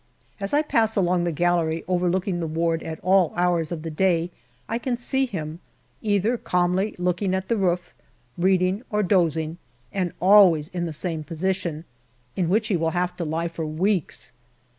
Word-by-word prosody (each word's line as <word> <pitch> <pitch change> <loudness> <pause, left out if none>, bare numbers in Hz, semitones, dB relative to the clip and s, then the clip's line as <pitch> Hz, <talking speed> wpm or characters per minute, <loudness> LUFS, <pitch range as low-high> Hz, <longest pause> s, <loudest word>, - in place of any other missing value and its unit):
As 195 0 -2
I 295 +1 +3
pass 220 -6 +2
along 180 -2 +2
the 170 - 0
gallery 165 0 +1
overlooking 180 +1 0
the 165 - -2
ward 165 +1 0
at 160 -1 -6
all 185 -2 +3
hours 175 -2 +1
of 160 -3 -4
the 165 - -4
day 175 0 +1 0.4
I 230 - -2
can 245 0 -2
see 265 +2 0
him, 160 -6 -5 0.4
either 215 +3 +1
calmly 180 +3 0
looking 180 +2 0
at 190 0 -4
the 230 - +2
roof, 180 -4 -1 0.4
reading 185 +2 +2
or 210 -1 +1
dozing, 165 -3 +1 0.3
and 185 -3 -1
always 180 -5 +6
in 175 -2 -3
the - - -4
same 160 0 -3
position, 170 -1 -3 0.5
in 175 -3 0
which 215 +4 +1
he 200 - +2
will 165 0 0
have 180 0 -1
to 175 - -2
lie 165 +2 -1
for 165 -1 -5
weeks. 170 -4 -1
180 Hz, 175 wpm, -24 LUFS, 165-195 Hz, 0.5 s, always